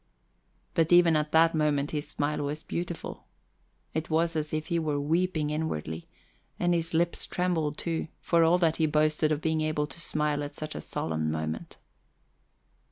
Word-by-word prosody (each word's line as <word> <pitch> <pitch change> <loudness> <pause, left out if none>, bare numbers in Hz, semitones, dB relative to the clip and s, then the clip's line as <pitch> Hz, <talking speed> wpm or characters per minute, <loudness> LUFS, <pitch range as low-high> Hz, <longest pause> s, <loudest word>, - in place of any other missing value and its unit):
But 165 0 +2
even 175 -2 +7
at 150 0 0
that 165 +1 +5
moment 150 -2 +1
his 150 -1 -3
smile 150 0 -1
was 145 +2 -3
beautiful. 175 -1 -5 0.7
It 160 0 -2
was 165 +1 +2
as 155 -1 -1
if 155 0 -2
he 170 -3 0
were 150 -3 0
weeping 160 0 0
inwardly, 85 - -3 0.5
and 175 0 +2
his 165 -1 -1
lips 170 +1 +1
trembled, 165 -5 0
too, 165 -1 -2
for 170 -1 +3
all 165 +2 +5
that 165 -3 +2
he 160 - +3
boasted 155 0 +2
of 150 0 0
being 160 -1 +1
able 155 -1 0
to 150 +4 -8
smile 150 -2 0
at 145 - -6
such 155 0 -5
a - - -5
solemn 80 -1 -2
moment. 80 0 -4
155 Hz, 170 wpm, -28 LUFS, 150-165 Hz, 0.7 s, even